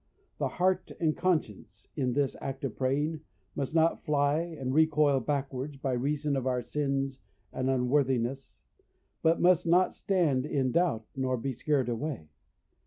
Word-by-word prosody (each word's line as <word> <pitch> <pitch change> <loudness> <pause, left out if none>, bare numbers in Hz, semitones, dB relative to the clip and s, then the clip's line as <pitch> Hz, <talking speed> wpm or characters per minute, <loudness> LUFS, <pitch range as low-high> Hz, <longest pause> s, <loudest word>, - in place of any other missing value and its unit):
The - - +1
heart 185 +1 0
and 155 -2 +1
conscience, 110 - -2
in 130 -4 0
this 140 0 0
act 135 0 -5
of 135 -5 -3
praying, 145 +4 0 0.4
must 140 +3 -3
not 165 0 +3
fly 145 0 +2
and 155 -6 -4
recoil 150 -2 +4
backwards 140 +1 -3
by 135 -1 -2
reason 145 +3 0
of 130 -1 -1
our 125 -1 0
sins 135 +1 -2 0.3
and 130 0 -1
unworthiness, 130 0 +1 0.7
and 165 +1 +3
must 180 -1 +4
not 180 +2 +4
stand 150 -9 +1
in 135 -4 0
doubt, 145 -9 +1
nor 130 -1 0
be 130 +3 -3
scared 140 -1 0
away. 120 - -4
140 Hz, 150 wpm, -29 LUFS, 130-155 Hz, 0.7 s, recoil